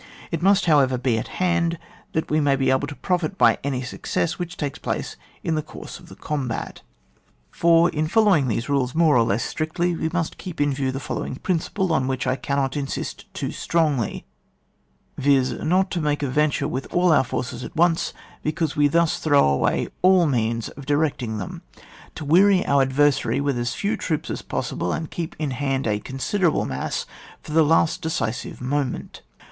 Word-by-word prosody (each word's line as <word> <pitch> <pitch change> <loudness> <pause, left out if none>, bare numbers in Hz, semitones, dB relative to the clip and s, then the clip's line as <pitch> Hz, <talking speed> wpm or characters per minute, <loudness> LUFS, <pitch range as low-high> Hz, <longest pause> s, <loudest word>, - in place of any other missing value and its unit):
It 165 - -2
must, 195 +2 +4
however, 140 -6 +4
be 125 -3 +1
at - - -5
hand, 170 -2 +1 0.4
that 160 - -2
we 155 - +3
may 145 -2 +3
be 135 -1 +1
able 130 +2 +1
to 145 - -7
profit 180 +5 -1
by - - +4
any 135 -2 -2
success 155 +7 -2
which 175 0 -5
takes 145 -3 -4
place - - -3 0.3
in 165 - 0
the 155 - 0
course - - -10
of - - -16
the - - -11
combat. 135 -6 -4 0.7
4. 170 +1 +4
In 155 0 -1
following 195 - +4
these 115 0 -1
rules 135 -2 0
more 160 -2 +4
or 120 - +5
lees 115 +1 0
strictly, 170 +2 -1
we 160 - -1
must 165 -1 -3
keep 180 -3 -7
in 145 -1 +2
view 135 -1 -1
the 135 - -4
follow - - -4
ing - - -5
principle, 185 +3 -1
on 130 -5 +1
which 130 -1 -2
I 130 0 +1
cannot 140 -1 -1
insist 140 -2 -4
too - - -3
strongly, 150 -9 0 0.9
viz., 135 -2 +3
not 185 +9 +1
to 175 - -1
make 150 -1 0
a - - +1
venture 150 +2 +1
with 130 +2 -4
all 175 0 +3
our 150 - +5
forces 125 0 -4
at - - -8
once, 170 0 +2 0.3
because 155 0 -1
we 145 0 +4
thus 165 +2 +2
throw 145 - +4
away 70 -1 +1
all 185 -1 +5
means 115 -5 0
of 140 -1 -12
directing 145 -7 0
them; 95 - -6 0.5
to 155 - -6
weary 185 +5 +5
our 140 -1 +3
adversary 135 -2 +2
with 140 -1 0
as 120 0 -2
few 205 +2 -1
troops 155 -4 -3
as - - -4
possible, 90 - -3
and 160 - -4
keep 165 -2 -4
in 150 -3 -2
hand 135 0 -1
a 105 -2 0
considerable 165 - 0
mass 70 0 -3 0.4
for - - -9
the 160 +1 +4
last 160 +1 +2
decisive 120 -9 -3
moment. 135 0 -3
145 Hz, 190 wpm, -23 LUFS, 130-165 Hz, 0.9 s, or